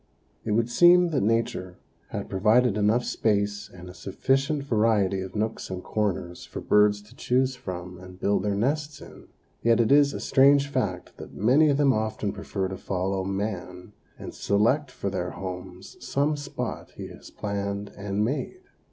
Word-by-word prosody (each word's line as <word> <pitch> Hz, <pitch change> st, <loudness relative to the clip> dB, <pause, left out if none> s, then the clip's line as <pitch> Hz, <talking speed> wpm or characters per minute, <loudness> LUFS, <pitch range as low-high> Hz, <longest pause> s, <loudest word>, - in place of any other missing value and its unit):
It 105 Hz, -, -1 dB
would 115 Hz, +1 st, +2 dB
seem 175 Hz, +4 st, +6 dB
that 150 Hz, -5 st, 0 dB
nature 105 Hz, -4 st, -1 dB, 0.3 s
had -, -, -5 dB
provided 110 Hz, +4 st, +3 dB
enough 105 Hz, +3 st, +2 dB
space 105 Hz, -3 st, -1 dB
and 90 Hz, 0 st, -11 dB
a 90 Hz, -, -10 dB
sufficient 135 Hz, -, 0 dB
variety 105 Hz, -6 st, +2 dB
of 95 Hz, +1 st, -7 dB
nooks 110 Hz, +1 st, -2 dB
and 95 Hz, -1 st, -5 dB
corners 95 Hz, -5 st, -2 dB
for -, -, -7 dB
birds 105 Hz, 0 st, +3 dB
to 110 Hz, +4 st, -18 dB
choose 130 Hz, +1 st, +1 dB
from 90 Hz, -5 st, -7 dB
and 90 Hz, 0 st, -12 dB
build 100 Hz, 0 st, +1 dB
their 100 Hz, 0 st, -1 dB
nests 145 Hz, +6 st, -1 dB
in; -, -, -13 dB, 0.3 s
yet 115 Hz, 0 st, +3 dB
it 115 Hz, +2 st, +3 dB
is 145 Hz, 0 st, +6 dB
a -, -, -4 dB
strange 140 Hz, +1 st, +4 dB
fact 105 Hz, -10 st, -3 dB
that -, -, -11 dB
many 135 Hz, +9 st, +4 dB
of 140 Hz, -, +2 dB
them 140 Hz, -2 st, +4 dB
often 110 Hz, -1 st, -2 dB
prefer 95 Hz, -1 st, -3 dB
to 95 Hz, 0 st, -6 dB
follow 95 Hz, +1 st, -2 dB
man, 95 Hz, -1 st, -4 dB, 0.2 s
and -, -, -8 dB
select, 120 Hz, +8 st, +1 dB
for 100 Hz, -6 st, -4 dB
their 90 Hz, -2 st, -2 dB
homes, 90 Hz, 0 st, -8 dB
some 145 Hz, +2 st, 0 dB
spot 145 Hz, -1 st, -6 dB
he -, -, -6 dB
has -, -, -12 dB
planned 100 Hz, -1 st, -4 dB
and 100 Hz, +1 st, -1 dB
made. 140 Hz, -, -3 dB
105 Hz, 170 wpm, -26 LUFS, 95-130 Hz, 0.3 s, seem